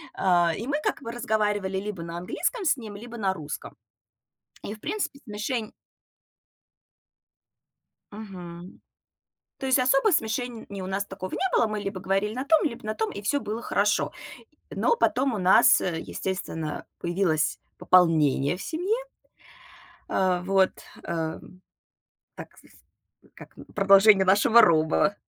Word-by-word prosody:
А, 175 Hz, -2 st, +3 dB
и 230 Hz, -, -5 dB
мы 285 Hz, +2 st, -1 dB
как -, -, -2 dB
бы 230 Hz, -, -5 dB
разговаривали 210 Hz, -5 st, -1 dB
либо 195 Hz, -2 st, -5 dB
на 170 Hz, 0 st, -6 dB
английском 375 Hz, -, -3 dB
с -, -, +3 dB
ним, 220 Hz, -6 st, -9 dB
либо 235 Hz, +3 st, -9 dB
на 195 Hz, -3 st, 0 dB
русском. 150 Hz, -3 st, -8 dB, 0.9 s
И, 210 Hz, -, -5 dB
в 215 Hz, -, -16 dB
принципе, 340 Hz, -, -4 dB
смешень 215 Hz, +1 st, -4 dB, 2.4 s
Мгм. 185 Hz, -4 st, -10 dB, 0.8 s
То 270 Hz, -, -6 dB
есть 260 Hz, 0 st, +3 dB
особо 270 Hz, +10 st, +3 dB
смешений 225 Hz, -, -2 dB
у 185 Hz, -, -5 dB
нас 195 Hz, +1 st, -2 dB
такого 190 Hz, -1 st, -7 dB
не 380 Hz, -, -1 dB
было. 230 Hz, -, +3 dB
Мы 215 Hz, 0 st, -3 dB
либо 195 Hz, -2 st, -5 dB
говорили 195 Hz, +3 st, -1 dB
на 255 Hz, +4 st, -4 dB
том, 320 Hz, +2 st, +4 dB
либо 245 Hz, -7 st, -3 dB
на 215 Hz, -, -2 dB
том, 220 Hz, 0 st, -2 dB
и 200 Hz, -, -7 dB
всё 285 Hz, +8 st, 0 dB
было 220 Hz, -2 st, -5 dB
хорошо. 210 Hz, -2 st, +1 dB, 0.6 s
Но 470 Hz, -, +1 dB
потом 275 Hz, -, +1 dB
у 215 Hz, -, -2 dB
нас, 185 Hz, 0 st, +5 dB
э, 170 Hz, -3 st, -2 dB
естественно, 165 Hz, -5 st, -5 dB
появилось 175 Hz, -3 st, 0 dB, 0.2 s
пополнение 160 Hz, -4 st, +3 dB
в -, -, -9 dB
семье. 360 Hz, +8 st, -1 dB, 1.1 s
А 185 Hz, -2 st, +1 dB
вот, 190 Hz, 0 st, +2 dB, 0.3 s
эм, 165 Hz, +2 st, -5 dB, 0.7 s
так, -, -, -11 dB
с -, -, -20 dB, 0.6 s
э, -, -, -22 dB
как, -, -, -13 dB
м, -, -, -10 dB
продолжение 195 Hz, 0 st, +6 dB
нашего 205 Hz, +5 st, +5 dB
роба. 165 Hz, +4 st, +3 dB
200 Hz, 145 wpm, -26 LUFS, 185-235 Hz, 2.4 s, продолжение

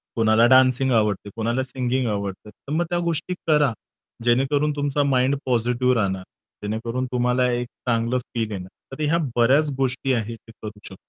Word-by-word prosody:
कोणाला 110 Hz, 0 st, +4 dB
डान्सिंग 130 Hz, 0 st, +5 dB
आवडते, 105 Hz, -3 st, +1 dB
कोणाला 115 Hz, +3 st, -1 dB
सिंगिंग 130 Hz, -1 st, -1 dB
आवडते. 100 Hz, 0 st, -4 dB
तर 140 Hz, -, -13 dB
मग 170 Hz, +2 st, +1 dB
त्या 175 Hz, -, 0 dB
गोष्टी 170 Hz, +1 st, -2 dB
करा 150 Hz, -4 st, +4 dB, 0.5 s
जेणेकरून 135 Hz, +5 st, +2 dB
तुमचा 145 Hz, 0 st, 0 dB
माइंड 135 Hz, 0 st, +2 dB
पॉझिटिव्ह 125 Hz, 0 st, +1 dB
राहणार. 95 Hz, -4 st, -1 dB, 0.4 s
जेणेकरून 115 Hz, +4 st, -2 dB
तुम्हाला 125 Hz, 0 st, +2 dB
एक 120 Hz, 0 st, -2 dB, 0.2 s
चांगलं 115 Hz, +1 st, +1 dB, 0.2 s
फील 115 Hz, -2 st, -2 dB
येणार. 95 Hz, -2 st, -6 dB, 0.2 s
तर 150 Hz, -, -4 dB
ह्या 155 Hz, +3 st, +2 dB, 0.2 s
बऱ्याच 140 Hz, +6 st, +3 dB
गोष्टी 130 Hz, 0 st, 0 dB
आहेत, 115 Hz, -1 st, -2 dB
ते -, -, -12 dB
करू 105 Hz, -, -5 dB
शकतो. 95 Hz, -, -9 dB
125 Hz, 160 wpm, -23 LUFS, 115-135 Hz, 0.5 s, डान्सिंग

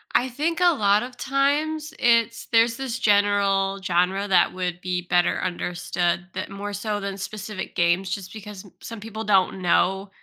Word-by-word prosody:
I 250 Hz, -, +3 dB
think 310 Hz, +7 st, -2 dB
a 355 Hz, -1 st, +5 dB
lot 205 Hz, -5 st, +3 dB
of 250 Hz, +1 st, -9 dB
times, 295 Hz, +3 st, 0 dB
it's 230 Hz, -1 st, +2 dB
there's 230 Hz, 0 st, +4 dB
this 260 Hz, -3 st, -3 dB
general 200 Hz, -2 st, +2 dB
genre 190 Hz, +2 st, +1 dB
that 190 Hz, -2 st, +3 dB
would 180 Hz, -1 st, -3 dB
be 180 Hz, -1 st, -2 dB
better 175 Hz, 0 st, +1 dB
understood 175 Hz, 0 st, -2 dB
that 185 Hz, -, -5 dB
more 205 Hz, +1 st, -6 dB
so 205 Hz, +1 st, -2 dB
than 195 Hz, -1 st, -5 dB
specific 210 Hz, 0 st, -6 dB
games 175 Hz, +1 st, +2 dB
just 185 Hz, 0 st, -5 dB
because 210 Hz, -2 st, -9 dB
m 195 Hz, -, -16 dB
some 230 Hz, -1 st, -8 dB
people 220 Hz, +1 st, -6 dB
don't 195 Hz, -2 st, +2 dB
know 190 Hz, +2 st, +1 dB
200 Hz, 170 wpm, -24 LUFS, 185-230 Hz, -, a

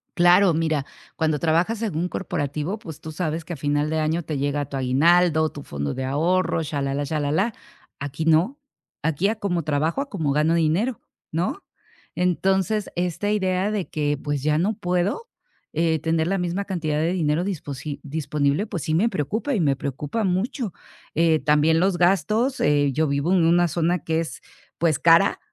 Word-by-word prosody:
Claro. 175 Hz, +1 st, +5 dB
Mira, 160 Hz, -3 st, 0 dB, 0.3 s
cuando 155 Hz, -2 st, 0 dB
trabajas 170 Hz, +8 st, +1 dB
en 215 Hz, -8 st, -2 dB
un 170 Hz, +3 st, 0 dB
corporativo, 150 Hz, +3 st, -3 dB
pues, 160 Hz, -5 st, -10 dB
tú 160 Hz, -, -7 dB
sabes 160 Hz, 0 st, -3 dB
que 175 Hz, -, -5 dB
a -, -, -4 dB
final 145 Hz, +2 st, 0 dB
de 160 Hz, 0 st, 0 dB
año 160 Hz, +2 st, 0 dB
te 155 Hz, -2 st, -3 dB
llega 145 Hz, +1 st, -1 dB
tu 140 Hz, 0 st, -6 dB
aguinaldo, 160 Hz, +5 st, +3 dB
tu 145 Hz, -, -9 dB
fondo 70 Hz, -, -4 dB
de 130 Hz, 0 st, -3 dB
ahorro, 165 Hz, +6 st, +1 dB
shalalá 140 Hz, -1 st, -2 dB
shalalá. 155 Hz, +9 st, 0 dB, 0.5 s
Aquí 145 Hz, +2 st, -4 dB
no. 165 Hz, -, +3 dB, 0.4 s
Aquí, 160 Hz, +4 st, +1 dB
a 220 Hz, -, -1 dB
como 185 Hz, -6 st, -2 dB
trabajo, 155 Hz, -, 0 dB
a 280 Hz, -, -5 dB
como 160 Hz, -, -1 dB
gano 155 Hz, +3 st, +2 dB
dinero, 170 Hz, +9 st, +1 dB, 0.3 s
¿no? 180 Hz, -, -2 dB, 0.5 s
Entonces 190 Hz, +3 st, +1 dB
esta 180 Hz, +3 st, -1 dB
idea 190 Hz, -1 st, 0 dB
de 205 Hz, -4 st, -2 dB
que, 145 Hz, -1 st, -1 dB
pues, 145 Hz, -2 st, -2 dB
ya 150 Hz, 0 st, +2 dB
no 190 Hz, +7 st, +1 dB
puedo, 180 Hz, -, -1 dB, 0.5 s
eh, 160 Hz, 0 st, +1 dB
tener 160 Hz, +1 st, 0 dB
la 195 Hz, +1 st, 0 dB
misma 180 Hz, +3 st, -2 dB
cantidad 160 Hz, -6 st, -2 dB
de 165 Hz, +3 st, +1 dB
dinero 160 Hz, -2 st, +1 dB
disposi 145 Hz, -6 st, -5 dB
disponible, 150 Hz, +2 st, -1 dB
pues, 170 Hz, -7 st, -4 dB
sí 155 Hz, -, -1 dB
me 210 Hz, +8 st, +3 dB
preocupa, 220 Hz, -, -2 dB
y -, -, 0 dB
me 140 Hz, -4 st, +2 dB
preocupa 140 Hz, -, -3 dB
mucho, 200 Hz, -, -1 dB, 0.4 s
eh, 165 Hz, -1 st, +3 dB
también 150 Hz, +2 st, +3 dB
los 185 Hz, 0 st, +2 dB
gastos. 195 Hz, -, +2 dB
Eh, 145 Hz, -1 st, +3 dB
yo 155 Hz, +4 st, +1 dB
vivo 140 Hz, +4 st, 0 dB
en 175 Hz, -3 st, +4 dB
una 175 Hz, +1 st, +4 dB
zona 170 Hz, +2 st, 0 dB
que 160 Hz, +1 st, -1 dB
es, 165 Hz, -1 st, -5 dB, 0.4 s
pues, 160 Hz, -4 st, +1 dB
cara. 165 Hz, +4 st, +5 dB
165 Hz, 180 wpm, -23 LUFS, 150-185 Hz, 0.5 s, Claro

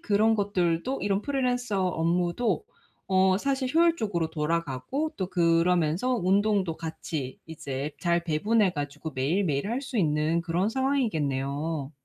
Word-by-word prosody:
그런 215 Hz, +2 st, +3 dB
것들도 200 Hz, +3 st, 0 dB
이런 200 Hz, -1 st, +1 dB
프리랜서 245 Hz, -8 st, 0 dB
업무도 175 Hz, -, 0 dB, 0.4 s
어 190 Hz, 0 st, +4 dB
사실 265 Hz, +2 st, -1 dB
효율적으로 220 Hz, -, +2 dB
돌아가고 165 Hz, -, -2 dB
또 185 Hz, -, -1 dB
그러면서 170 Hz, +2 st, +2 dB
운동도 195 Hz, -3 st, +1 dB
같이 155 Hz, -4 st, -5 dB
이제 145 Hz, -3 st, -5 dB
잘 170 Hz, -1 st, +1 dB
배분해 200 Hz, +6 st, +2 dB
가지고 145 Hz, +1 st, -5 dB
매일매일 150 Hz, +4 st, 0 dB
할 250 Hz, +4 st, -2 dB
수 260 Hz, -3 st, -3 dB
있는 155 Hz, -1 st, +1 dB
그런 175 Hz, +4 st, 0 dB
상황이겠네요. 155 Hz, -, -1 dB
180 Hz, 305 characters per minute, -27 LUFS, 160-215 Hz, 0.4 s, 어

